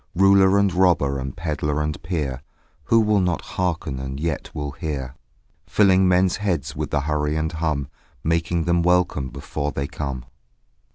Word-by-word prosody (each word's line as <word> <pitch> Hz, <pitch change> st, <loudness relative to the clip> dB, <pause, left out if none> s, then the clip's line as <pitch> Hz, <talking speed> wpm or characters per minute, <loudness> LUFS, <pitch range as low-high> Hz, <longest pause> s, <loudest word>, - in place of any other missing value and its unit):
Ruler 95 Hz, +1 st, +5 dB
and 100 Hz, -2 st, +2 dB
robber 85 Hz, -7 st, +2 dB
and 65 Hz, 0 st, -6 dB
pedlar 75 Hz, -3 st, -2 dB
and 75 Hz, 0 st, -2 dB
peer, 75 Hz, -7 st, -3 dB, 0.4 s
Who 115 Hz, 0 st, +4 dB
will 105 Hz, -1 st, +3 dB
not 90 Hz, -2 st, 0 dB
harken 85 Hz, -7 st, -3 dB
and 65 Hz, +1 st, -5 dB
yet 80 Hz, -1 st, -2 dB
will 75 Hz, -1 st, -4 dB
hear; 70 Hz, -4 st, -4 dB, 0.5 s
Filling 95 Hz, -2 st, +4 dB
men's 90 Hz, 0 st, +3 dB
heads 85 Hz, -9 st, -2 dB
with 75 Hz, 0 st, -3 dB
the 75 Hz, -, 0 dB
hurry 75 Hz, +1 st, -1 dB
and 80 Hz, +1 st, -1 dB
hum 80 Hz, -4 st, -2 dB, 0.4 s
Making 85 Hz, +1 st, 0 dB
them 85 Hz, +1 st, +2 dB
welcome 90 Hz, -6 st, +2 dB
before 70 Hz, +2 st, -4 dB
they 70 Hz, 0 st, -3 dB
come. 70 Hz, -4 st, -5 dB
80 Hz, 160 wpm, -23 LUFS, 70-90 Hz, 0.5 s, Ruler